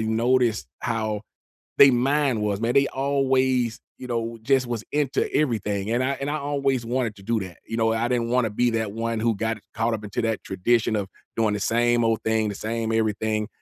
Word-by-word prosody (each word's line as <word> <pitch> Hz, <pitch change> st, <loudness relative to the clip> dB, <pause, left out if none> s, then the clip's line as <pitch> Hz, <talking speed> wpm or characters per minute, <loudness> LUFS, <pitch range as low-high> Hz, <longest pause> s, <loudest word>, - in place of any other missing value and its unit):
noticed 115 Hz, +1 st, +1 dB
how 110 Hz, -2 st, -1 dB, 0.6 s
they 140 Hz, -, +9 dB
mind 130 Hz, -2 st, +1 dB
was, 105 Hz, -1 st, -1 dB
man, 120 Hz, +1 st, 0 dB
they 140 Hz, 0 st, +5 dB
always, 130 Hz, -3 st, +1 dB, 0.2 s
you 125 Hz, -, -7 dB
know, 115 Hz, -1 st, -3 dB
just 135 Hz, +1 st, +2 dB
was 120 Hz, -2 st, -4 dB
into 145 Hz, -2 st, 0 dB
everything, 105 Hz, -7 st, 0 dB
and 125 Hz, +2 st, +1 dB
I 130 Hz, -, +1 dB
and 140 Hz, -, -2 dB
I 150 Hz, -, -1 dB
always 140 Hz, -3 st, 0 dB
wanted 120 Hz, -3 st, -1 dB
to 100 Hz, -, -14 dB
do 115 Hz, +2 st, 0 dB
that, 95 Hz, -3 st, -8 dB
you 115 Hz, -, -4 dB
know, 115 Hz, -1 st, +2 dB
I 115 Hz, +1 st, 0 dB
didn't 120 Hz, -2 st, 0 dB
wanna 125 Hz, -2 st, +2 dB
be 120 Hz, +4 st, +1 dB
that 110 Hz, -3 st, -1 dB
one 115 Hz, 0 st, -2 dB
who 115 Hz, 0 st, +2 dB
got 110 Hz, +2 st, -1 dB, 0.2 s
caught 115 Hz, 0 st, 0 dB
up 110 Hz, -1 st, -5 dB
into 105 Hz, +3 st, -3 dB
that 115 Hz, -1 st, -1 dB
tradition 110 Hz, +4 st, +1 dB
of 100 Hz, -2 st, -2 dB, 0.3 s
doing 110 Hz, -2 st, +2 dB
the 105 Hz, -, -3 dB
same 120 Hz, +2 st, +2 dB
old 115 Hz, -1 st, +1 dB
thing, 110 Hz, -1 st, +1 dB
the 100 Hz, -, -3 dB
same 115 Hz, +2 st, -2 dB
everything, 110 Hz, -1 st, 0 dB
115 Hz, 205 wpm, -24 LUFS, 110-125 Hz, 0.6 s, they